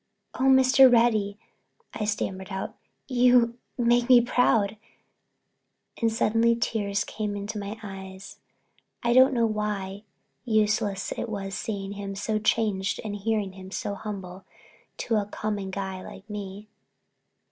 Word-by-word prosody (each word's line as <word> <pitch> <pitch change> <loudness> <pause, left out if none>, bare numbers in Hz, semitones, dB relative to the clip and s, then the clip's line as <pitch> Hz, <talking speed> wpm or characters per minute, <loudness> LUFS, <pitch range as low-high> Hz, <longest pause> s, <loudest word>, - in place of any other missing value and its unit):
"Oh, 260 - -1
Mr. 265 0 +7
Reddy," 220 -4 +3 0.6
I 215 - -3
stammered 190 -2 -2
out, 190 -1 -5 0.3
"you 245 -2 +4 0.2
make 240 0 +2
me 250 -1 +9
proud," 225 -3 +2 1.2
and 230 -1 +3
suddenly 225 +1 +2
tears 210 -3 -1
came 210 -2 -4
into 205 +1 -4
my 205 +2 -5
eyes. 190 -1 -9 0.6
I 235 0 +3
don't 260 +2 +7
know 235 -3 +2
why 210 -2 -3 0.5
unless 210 -3 +1
it 235 - -4
was 195 -2 -4
seeing 195 -2 -4
him 200 -1 -6
so 215 +2 -1
changed 210 -3 0
and 210 -2 -4
hearing 205 -1 -1
him 190 0 -10
speak - - -11
so 205 - -2
humble 190 -2 -7 0.6
to 225 - +1
a 205 -1 -1
common 205 -2 -3
guy 190 -1 -4
like 195 +2 -11
me. 205 0 -7
210 Hz, 135 wpm, -26 LUFS, 195-230 Hz, 1.2 s, me